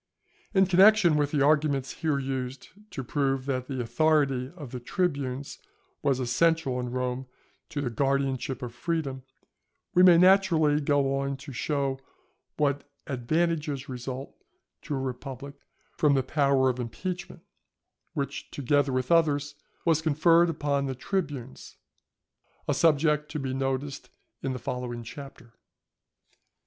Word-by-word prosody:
In 190 0 +6
connection 190 -2 +6
with 145 -1 +2
the 145 -2 +1
arguments 145 -3 +2
here 155 -4 +1
used 130 -1 -4 0.2
to 135 - -5
prove 135 0 -1
that 130 -2 -2
the 135 -2 -4
authority 135 -1 +1
of 145 -8 -9
the 125 - -5
tribunes 140 -2 -2 0.4
was 140 -5 +1
essential 135 +2 +1
in 125 0 -3
Rome 125 +1 -3 0.4
to 150 -3 -3
the 125 -4 -2
guardianship 135 0 -1
of 120 -2 -5
freedom, 140 0 -2 0.7
we 180 - +5
may 180 -2 +8
naturally 170 -5 +4
go 140 -1 +1
on 140 0 -2
to 135 0 -10
show 135 +2 -1 0.6
what 145 -1 0 0.2
advantages 150 +1 -1
result 130 +1 -6 0.5
to 145 - -4
a - - -2
republic 135 +1 -6 0.4
from 145 -2 +4
the 135 - +2
power 140 -1 +2
of 130 -1 0
impeachment; 175 +10 -5 0.7
which, 140 -1 -4
together 145 0 +1
with 130 +2 -1
others, 145 -3 +3 0.3
was 160 -2 +3
conferred 165 +2 +4
upon 145 -3 -1
the 130 - -3
tribunes; 140 -4 -4 0.9
a - - +2
subject 150 -1 +2
to 155 - -4
be 135 -2 -3
noticed 135 +1 -3 0.3
in 135 - -2
the - - -4
following 120 -1 -4
Chapter. 125 -1 -11
140 Hz, 135 wpm, -27 LUFS, 130-155 Hz, 0.9 s, may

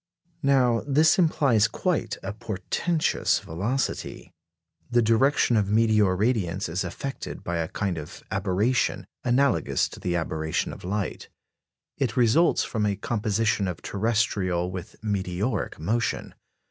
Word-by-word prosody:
Now 125 -5 +3
this 155 +5 +4
implies 135 - +3
quite 115 - -1
a 95 - -4
portentous 115 - 0
velocity. 105 +12 -3 0.6
The 120 -1 +3
direction 120 +2 +3
of 100 -3 +2
meteor 105 -3 +3
radiants 100 -4 0
is 85 +3 -2
affected 135 +10 -6
by 85 0 -2
a 80 -1 -1
kind 95 -3 -2
of 75 - -10
aberration, 100 +6 0 0.2
analogous 125 - +2
to - - -11
the 90 -1 -1
aberration 80 -2 -2
of - - -12
light. 100 +1 -3 0.7
It 130 -4 -1
results 125 +8 +4
from 105 -2 -1
a 100 - 0
composition 105 -1 0
of 90 - -5
terrestrial 100 -5 0
with 90 -1 -7
meteoric 100 +1 -2
motion. 110 +9 -1
105 Hz, 125 wpm, -26 LUFS, 95-120 Hz, 0.7 s, this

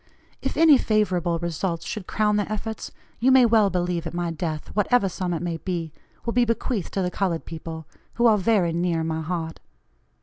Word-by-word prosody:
If - - -3
any 315 -4 +7
favorable 185 -6 +1
results 170 0 -3
should 210 -5 -5
crown 210 -1 +1
their 205 0 -1
efforts, 220 +1 -4 0.3
you 255 +3 +4
may 260 -1 +7
well 220 -3 +4
believe 175 -2 -1
at 170 - -6
my 175 -1 -1
death, 160 -1 -4
whatever 210 +1 +2
sum 185 -1 -3
it 170 -1 -2
may 170 -2 -2
be, 165 -2 -4 0.3
will 235 - -1
be 245 - +4
bequeathed 230 -3 -1
to 195 - +1
the 180 - -1
colored 180 -3 -1
people, 160 0 -7 0.3
who 235 - +2
are 215 -3 +5
very 190 -5 +2
near 170 -1 0
my 160 0 -2
heart. 165 0 -4
180 Hz, 195 wpm, -24 LUFS, 165-215 Hz, 0.3 s, any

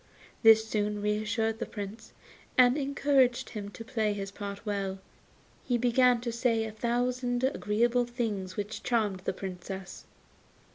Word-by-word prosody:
This 220 -1 +7
soon 210 -1 -1
reassured 215 +2 0
the 235 - -3
Prince, 210 +2 -7 0.5
and 250 0 +6
encouraged 275 -3 +2
him 205 -2 -5
to 225 +2 -10
play 220 -4 0
his 195 -1 -5
part 200 +1 -7
well, 200 -2 -1
and 190 - -12 0.6
he 245 - +1
began 245 +1 +4
to 240 -1 -2
say 230 -1 +1
a 220 - -4
thousand 245 +2 -1
agreeable 240 -1 +2
things 210 -6 -3
which 210 +1 -4
charmed 215 -6 0
the - - 0
Princess. 190 0 -7
225 Hz, 145 wpm, -29 LUFS, 205-245 Hz, 0.6 s, This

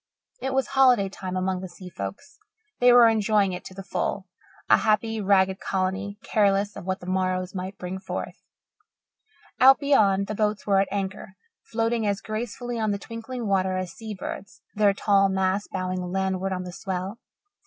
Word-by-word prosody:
It 265 0 -2
was 270 - +1
holiday 255 -7 +4
time 185 -1 -5
among 185 0 -1
the 185 - -6
sea 180 +1 -11
folks. 100 - -7 0.4
They 245 0 +6
were 240 -1 +8
enjoying 210 -3 +2
it 180 - -6
to 185 - -10
the 195 - -7
full, 195 0 -2 0.4
a - - +6
happy, 220 0 +1
ragged 190 -1 +3
colony, 195 +2 -2
careless 200 -1 +2
of - - -8
what 185 0 -2
the - - -9
morrows 185 0 -1
might 190 +1 -5
bring 180 +1 -5
forth. - - -6 1.2
Out 265 +1 +8
beyond, 205 -9 +3
the 215 - -4
boats 210 -1 -1
were 195 -2 +3
at 195 - +2
anchor, 190 -1 -4 0.3
floating 225 -1 0
as 200 -1 0
gracefully 235 +2 -4
on 215 -1 0
the 200 - 0
twinkling 230 +4 -6
water 190 -2 +1
as 185 -2 -4
sea 220 -2 -7
birds, 190 +1 -8
their 205 -1 +3
tall 195 -1 +3
masts 190 +1 0
bowing 185 -1 -2
landward 190 +1 -1
on 185 -1 -2
the 180 -1 -8
swell. 190 +4 -4
195 Hz, 175 wpm, -25 LUFS, 185-215 Hz, 1.2 s, were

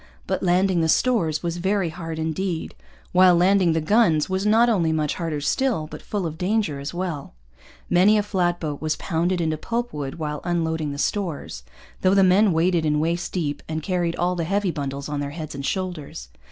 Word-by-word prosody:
But - - -2
landing 180 0 +2
the 160 - +1
stores 175 -9 +2
was 170 0 -2
very 190 0 0
hard 165 -1 -6
indeed; 160 +2 -3 0.4
while 180 -1 +6
landing 180 -1 +4
the 160 - +1
guns 165 -4 +3
was 190 +2 -1
not 225 +3 +5
only 180 -9 +2
much 155 -2 0
harder 165 -4 -3
still, 240 - 0
but 155 - -9
full 205 -4 -3
of 160 0 -5
danger 190 -6 0
as 140 +1 -5
well. 175 - -5 0.5
Many 190 +5 +5
a 210 - +2
flat 180 -4 0
boat 150 -3 -4
was 155 0 0
pounded 175 +1 -1
into 160 -2 0
pulpwood 190 - -3
while 150 -3 -4
unloading 160 -3 -1
the 140 - -6
stores, 160 - -3 0.4
though 185 +1 +3
the 195 - +5
men 190 +3 +5
waded 170 +1 +2
in 150 -1 +1
waist 170 +3 -1
deep 150 -5 -2
and 155 -1 -3
carried 175 -2 -1
all 180 +1 0
the 170 - -2
heavy 195 +2 0
bundles 140 -2 -4
on 150 -1 -3
their 140 0 -3
heads 155 -2 -6
and 140 -1 -4
shoulders. 175 - -4
170 Hz, 195 wpm, -23 LUFS, 155-190 Hz, 0.5 s, while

